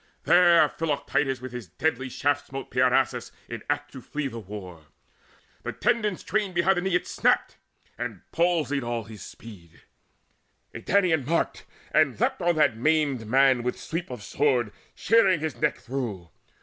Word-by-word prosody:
There 170 -3 +6
Philoctetes 145 -4 -1
with 130 -1 -7
his 120 -5 -7
deadly 130 - -2
shaft 145 +2 -1
Smote 135 0 -7
Peirasus 125 0 +2 0.2
in - - -6
act 145 0 -1
to 130 - -9
flee 150 +3 -4
the 115 -3 -7
war: 90 -6 -9 0.7
The - - -5
tendons 210 -5 0
twain 205 -3 -1
behind 180 +2 +2
the - - +1
knee 190 -1 0
it 180 - +1
snapped, - - +1 0.4
And - - -5
palsied 165 -5 +1
all 120 -1 -2
his 105 -2 -11
speed. 85 -8 -13 0.9
A - - -6
Danaan 180 -7 +2
marked, 165 +2 -1 0.3
And 145 -8 +2
leapt - - 0
on 175 -1 +2
that 145 -6 +3
maimed 140 -3 +1
man 130 +1 +4
with 125 +1 -3
sweep 165 +2 -4
of 125 -5 -7
sword 125 -3 +1 0.2
Shearing 210 -6 +4
his 155 -2 -4
neck - - 0
through. 110 -10 -5
140 Hz, 160 wpm, -26 LUFS, 120-165 Hz, 0.9 s, There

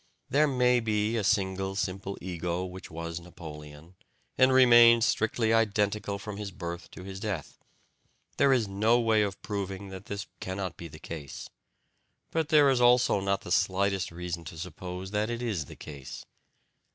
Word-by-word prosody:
There 150 +3 +4
MAY 125 -2 +3
be 110 0 0
a 110 - 0
single 95 -2 0
simple 95 -1 -3
ego 90 0 -3
which 95 0 -9
was 85 +1 -5
Napoleon, 80 -2 -11 0.4
and 130 0 +5
remained 120 -3 +7
strictly 110 0 +1
identical 105 -2 +1
from 105 0 -7
his 105 -1 -4
birth 85 -3 -7
to 90 - -9
his 95 0 -7
death. 100 -7 -5 0.8
There 140 -1 +4
is 120 -5 +3
no 110 +5 +3
way 110 -2 +3
of 100 -1 -2
proving 100 -1 -4
that 95 +1 -9
this 100 0 -4
cannot 95 -1 -4
be 85 - -8
the 75 -1 -12
case, 75 -4 -8 0.8
but 160 -2 -1
there 145 -3 +6
is 125 -2 +1
also 120 -3 +5
not 100 0 0
the 90 - -9
slightest 95 0 +1
reason 85 0 -5
to 80 - -8
suppose 90 +2 -7
that 105 +1 0
it 120 +1 -3
is 100 -11 -2
the - - -11
case. 70 -3 -9
100 Hz, 165 wpm, -29 LUFS, 90-115 Hz, 0.8 s, remained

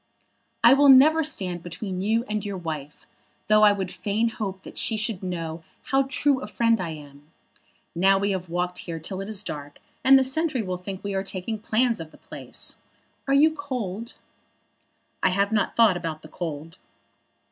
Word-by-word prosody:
"I - - +9
will 280 +1 +5
never 305 +5 +7
stand 185 - -2
between 180 +2 -5
you 225 +4 +1
and 210 0 -2
your 200 -2 -4
wife, 155 -4 -6 0.4
though 215 0 +4
I 210 -1 +7
would 190 -2 -3
fain 215 +3 -1
hope 195 -4 -5
that - - -7
she 220 - 0
should 215 -2 -2
know 165 -3 -4 0.3
how 270 0 +3
true 275 0 +1
a - - -6
friend 230 0 +1
I 175 - -3
am. 145 -1 -11 0.6
Now 190 +3 +4
we 200 +1 0
have 185 -2 -3
walked 180 +1 -2
here 165 -2 -6
till 185 +4 -5
it 195 - -6
is 210 -2 -1
dark, 145 -4 -7 0.3
and 270 +1 +8
the 265 - +4
sentry 265 -1 -1
will 185 -2 -3
think 190 +1 -7
we 200 -1 -3
are 190 - 0
taking 195 +3 -4
plans 230 +1 +1
of 160 -1 -7
the - - -18
place. - - -7 0.5
Are 275 - +3
you 310 +3 +5
cold?" 235 -7 -5 1.1
"I - - +4
have 200 +2 +1
not 210 -3 0
thought 220 -6 +5
about 165 -3 -5
the 155 - -12
cold." 165 0 -6
200 Hz, 190 wpm, -25 LUFS, 175-230 Hz, 1.1 s, I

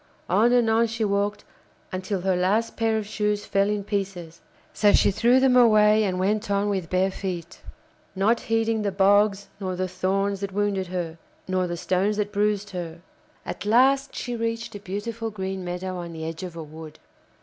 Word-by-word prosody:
On 215 +7 +4
and 245 -2 +4
on 225 +1 +3
she 225 0 -2
walked 205 +1 -1 0.5
until 185 +1 -3
her 190 0 +1
last 200 +6 +1
pair 225 -1 +1
of 215 - -3
shoes 210 0 -1
fell 200 0 +1
in 210 -1 -1
pieces. 190 -5 -4 0.3
So 205 -1 +4
she - - +4
threw 240 +6 +4
them 260 -1 +4
away 215 -3 +5
and 185 -2 -1
went 210 +3 0
on 200 +1 +1
with 190 -5 -2
bare 185 +1 +1
feet, 185 -2 -6 0.5
not 215 +5 +2
heeding 225 0 0
the 205 -1 -1
bogs 200 +1 +3
nor 185 -2 -3
the 185 +1 -1
thorns 195 +2 -1
that 200 0 -4
wounded 200 -2 0
her, 170 -2 -4 0.3
nor 185 -1 0
the 175 0 -4
stones 190 +5 0
that 210 -1 -1
bruised 205 0 0
her. 170 -2 -6 0.4
At - - -5
last 265 +6 +3
she 245 -1 -4
reached 230 0 -3
a 205 - -7
beautiful 210 +4 -4
green 190 -2 -4
meadow 180 +1 -4
on 170 -1 -6
the 160 -1 -6
edge 165 0 -5
of 180 -2 -7
a 165 - -6
wood. 155 0 -11
200 Hz, 190 wpm, -25 LUFS, 185-215 Hz, 0.5 s, away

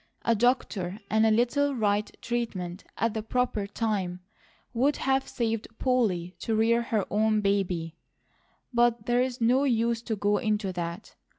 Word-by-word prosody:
A 230 - +4
doctor 210 -5 0
and 220 +1 +4
a - - +4
little 260 +6 +2
right 210 -2 +1
treatment 200 -7 -3
at 230 -1 0
the 220 - -2
proper 220 -2 -1
time 200 -5 -2 0.5
would 270 +5 +2
have 270 0 +1
saved 225 -2 -2
Polly 205 -9 +1
to 225 - -1
rear 230 +2 +3
her 220 -4 -1
own 215 +1 +2
baby; 185 -5 -1 0.8
but 240 -2 +2
there's 245 +1 +1
no 245 +4 +3
use 235 -3 +1
to 230 -2 -3
go 205 0 +1
into 210 -4 -1
that. 170 +3 -5
220 Hz, 150 wpm, -27 LUFS, 200-240 Hz, 0.8 s, A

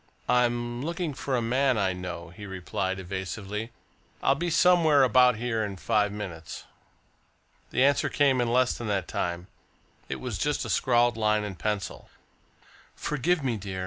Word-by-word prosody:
"I'm 120 -1 +1
looking 170 +1 -3
for 135 0 -2
a 120 - 0
man 130 +2 +2
I 95 -2 +1
know," 90 -2 -6
he 105 +4 -10
replied 95 0 -3
evasively. 95 +4 -5 0.5
"I'll - - +5
be 170 +5 -2
somewhere 165 -4 +5
about 125 -1 +5
here 115 0 -1
in 100 -2 -4
five 105 +1 +1
minutes." 90 -6 -7 1.1
The 130 - +2
answer 140 +1 +3
came 135 -3 +3
in 120 -1 0
less 125 +1 +3
than 120 - -6
that 100 -3 -1
time. 85 0 -3 0.6
It - - -3
was - - -4
just - - 0
a - - -3
scrawled 120 -2 +3
line 105 -1 +2
in 105 -2 -4
pencil: 105 +2 -4 0.9
"Forgive 155 +3 0
me, 120 -4 0
dear. 95 -2 -6
115 Hz, 160 wpm, -27 LUFS, 95-130 Hz, 1.1 s, I'll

